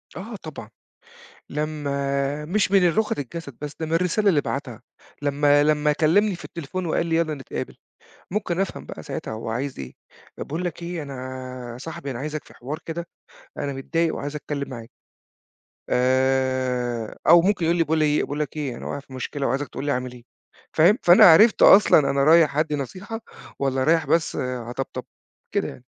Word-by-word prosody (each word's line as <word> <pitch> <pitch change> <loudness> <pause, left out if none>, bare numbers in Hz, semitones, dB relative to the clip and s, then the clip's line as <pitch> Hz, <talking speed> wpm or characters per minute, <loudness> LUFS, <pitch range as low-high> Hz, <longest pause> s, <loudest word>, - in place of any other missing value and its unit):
آه، 215 +6 -7
طبعًا 155 - -9 0.8
لمّا 140 -1 -2
مش 195 +4 0
من 190 -3 +5
اللغة 215 +5 +1
للجسد، 140 -1 -6
بس 145 -1 -5
ده 160 - -2
من 160 - -6
الرسالة 180 +5 +2
اللي 160 -7 +4
بعتها، 130 -5 -5 0.4
لمّا 145 0 +3
لمّا 150 0 +2
كلمني 185 +7 +3
في - - -13
التليفون 170 +3 -5
وقال 165 +1 0
لي 165 - +1
يالّا 165 -2 +1
نتقابل، 135 -3 -6 0.5
ممكن 185 -3 -1
أفهم 195 - -3
بقى - - -8
ساعتها - - -5
هوعايز 115 +5 -4
إيه، 65 -2 -7 0.5
باقول 165 +5 -4
لك 175 -1 -4
إيه 170 -1 -4
أنا 140 -1 -7 0.6
يا 120 - -9
صاحبي 140 0 -7
أنا 120 - -5
عايزك 150 +2 -4
في - - -17
حوار 140 +6 -6
كده، 170 +1 -4 0.5
أنا 140 -1 -3
متضايق 165 +5 -1
وعايز 145 +1 -5
أتكلم 145 -1 -4
معاك، 115 -3 -9 1.0
آآ، 130 -2 +1
أو 170 +1 +8
ممكن 190 -1 +1
يقول 170 +1 +2
لي 165 - +4
باقول 160 0 0
ايه 150 -1 +2
"باقول 145 +1 -4
لك 150 0 -3
إيه 140 -5 -3
أنا - - -9
واقع - - -4
في 135 -1 -15
مشكلة 135 +2 -3
وعايزك 135 +4 -1
تقول 140 - -6
لي 145 - +1
أعمل 125 -1 -2
إيه." 120 -1 -13 0.5
فاهم؟ 160 +2 +5
فهمت 210 +5 +2
فأنا 175 +1 +8
عرفت 195 +7 +7
أصلًا 195 -5 +8
أنا 140 0 +2
رايح 155 -2 +5
ادّي 155 -1 +1
نصيحة 190 - -6 0.4
والّا 135 -1 0
رايح 160 +2 +3
بس 165 -1 +1
أطبطب، 125 -1 -4 0.5
كده - - 0
يعني. 65 - -10
150 Hz, 180 wpm, -23 LUFS, 135-170 Hz, 1.0 s, أو